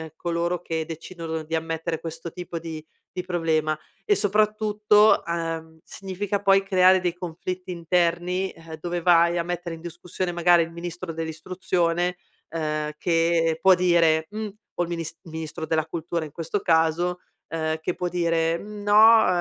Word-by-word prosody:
coloro 170 +1 -1
che 160 -1 -2
decidono 165 0 -6
di 160 +1 -9
ammettere 165 0 -2
questo 165 0 -6
tipo 175 -2 -6
di 160 -2 -7 0.3
di 180 - -3
problema 160 -3 0 0.2
e 415 - +3
soprattutto, 210 - +3
ehm, 165 -1 -4
significa 195 +1 -4
poi 195 -1 +4
creare 185 -1 +5
dei 175 -2 -1
conflitti 180 +1 -6
interni, 175 +2 0
ehm, 165 -1 -10
dove 175 0 -2
vai 170 0 +4
a 170 - 0
mettere 175 -1 -4
in - - -12
discussione 175 +1 -5
magari 175 0 +5
il 165 - -7
ministro 170 0 -6
dell'Istruzione, 175 +2 -1 0.3
ehm, 155 -1 -2
che 165 -1 +2
può 190 -1 +7
dire: 170 -3 +3
"Mh", 215 0 -4 0.2
o 175 - 0
il 170 - -5
minis 165 -2 -3
il 165 -4 -13
ministro 160 0 -5
della 160 -1 0
Cultura 165 0 -3
in 150 - -10
questo 165 +5 -2
caso, 170 +1 +2 0.3
ehm, 160 -1 -2
che 170 +2 -3
può 180 -1 -2
dire: 165 -1 +1
"Mhmm, 210 +1 -9
no, 220 +2 +7
170 Hz, 160 wpm, -25 LUFS, 165-180 Hz, 0.3 s, può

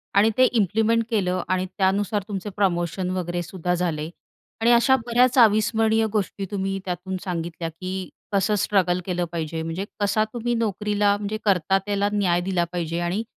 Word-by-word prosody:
आणि 205 +2 +5
ते 255 - +6
इम्प्लिमेंट 225 0 +2
केलं 185 -5 0
आणि 185 0 +1
त्यानुसार 195 +2 0
तुमचे 205 -1 -4
प्रमोशन 180 -1 0
वगैरे 175 -1 -2
सुद्धा 180 0 -3
झाले 165 -3 -2 0.5
आणि 235 - +4
अशा 240 +3 +5
बऱ्याच 245 +2 +3
अविस्मरणीय 220 0 +4
गोष्टी 200 -2 -2
तुम्ही 195 -1 -2
त्यातून 185 +1 -4
सांगितल्या 170 -2 -4
की 185 +3 -6 0.2
कसं 200 +1 +2
स्ट्रगल 185 -3 +1
केलं 180 -2 -1
पाहिजे, 160 -1 -3
म्हणजे 165 +4 -4
कसा 205 +1 +2
तुम्ही 240 0 -1
नोकरीला 210 -2 +1
म्हणजे 210 +1 -3
करता 190 -1 +3
त्याला 205 0 0
न्याय 180 -4 +2
दिला 180 -1 0
पाहिजे 170 -1 -2
आणि 175 +5 -1
195 Hz, 155 wpm, -24 LUFS, 180-210 Hz, 0.5 s, ते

